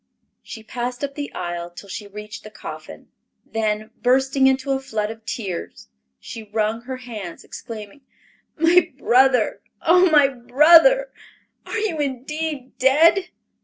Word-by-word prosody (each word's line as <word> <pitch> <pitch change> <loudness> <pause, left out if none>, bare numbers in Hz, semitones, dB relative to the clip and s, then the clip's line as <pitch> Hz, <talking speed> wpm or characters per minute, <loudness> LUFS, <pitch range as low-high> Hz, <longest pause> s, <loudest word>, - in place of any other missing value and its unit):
She 220 - -10
passed 245 +3 -5
up 280 0 -3
the 285 0 -6
aisle 175 -1 -4
till 175 +3 -12
she 205 +2 -7
reached 210 +4 -9
the 215 - -10
coffin, 210 - -10 0.4
then 215 0 -2
bursting 265 +2 +3
into 265 +1 +1
a 270 - +1
flood 220 -6 -3
of 225 0 -12
tears, 190 -8 -6 0.3
she 225 - -8
wrung 220 +1 -1
her 260 +1 -6
hands, 215 -9 -8
exclaiming, 220 +2 -9 0.6
"My 345 +2 +4
brother, 250 -5 +3 0.2
oh 360 +2 +5
my 295 -3 +6
brother—are 330 - +2
you 420 -8 -2
indeed 285 +1 -4
dead?" 330 +8 +4
255 Hz, 130 wpm, -22 LUFS, 215-295 Hz, 0.6 s, my